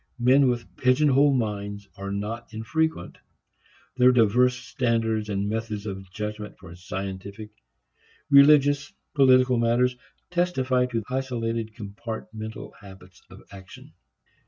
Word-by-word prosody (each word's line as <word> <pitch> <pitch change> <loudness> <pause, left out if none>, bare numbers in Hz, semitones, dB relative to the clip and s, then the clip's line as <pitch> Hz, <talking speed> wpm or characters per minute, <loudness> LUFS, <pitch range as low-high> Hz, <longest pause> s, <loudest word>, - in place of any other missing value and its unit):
Men 130 +2 +4
with 120 -1 -4
"pigeon 130 +4 +3
hole" 140 +2 +4
minds 100 -5 -3
are 100 0 -6
not 105 +4 -5
infrequent. 160 +9 -2 0.8
Their 125 0 +6
diverse 125 +1 +3
standards 115 -4 -1
and 100 0 -1
methods 110 -1 -4
of 95 -2 -7
judgment 105 0 -6
for 90 -2 -12
scientific, 95 +3 -7 0.8
religious, 140 0 +5 0.2
political 130 -3 +4
matters 120 +2 +2 0.4
testify 130 -8 +1
to 115 -3 -3
isolated 115 -4 -3
compartmental 110 0 -7
habits 95 -2 -15
of - - -14
action. 95 -1 -13
115 Hz, 110 wpm, -25 LUFS, 105-130 Hz, 0.8 s, Their